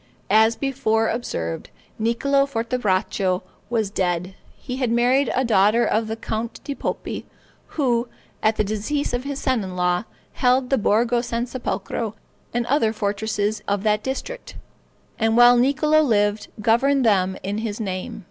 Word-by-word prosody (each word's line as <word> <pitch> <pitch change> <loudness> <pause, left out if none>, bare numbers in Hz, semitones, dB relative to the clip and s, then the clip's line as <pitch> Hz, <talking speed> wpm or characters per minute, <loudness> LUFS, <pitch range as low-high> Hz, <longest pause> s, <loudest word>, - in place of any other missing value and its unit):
As 220 +2 +5
before 225 -5 0
observed, 85 - -3 0.3
Niccolo 275 +5 +2
Fortebraccio 210 -7 0 0.3
was 220 -4 0
dead. 180 -1 -1 0.2
He 255 -1 -6
had 255 -3 0
married 245 +3 +3
a 260 - +1
daughter 215 +1 +4
of 220 +1 +1
the 220 - -3
Count 225 +1 -4
di 285 - -4
Poppi, - - -4 0.5
who, 245 -4 +1 0.3
at 215 0 +2
the 215 - +1
decease 215 +9 -2
of 245 +2 -2
his 280 -1 -3
son 260 -6 0
in 185 -1 -6
law, 180 +2 +1 0.3
held 255 +1 +2
the 270 - +3
Borgo 235 +3 +2
San 235 0 -2
Sepolcro, 225 -3 -4 0.4
and 240 0 -1
other 235 -4 +2
fortresses 210 0 -1
of 200 0 0
that 210 -1 +2
district, 270 - -5 0.6
and 225 0 +2
while 245 0 +8
Niccolo 285 +5 +3
lived, 210 -6 +1
governed 255 +5 +3
them 190 -3 +2
in 205 +2 -2
his 220 -1 -4
name. 185 -4 -4
225 Hz, 150 wpm, -22 LUFS, 205-250 Hz, 0.6 s, while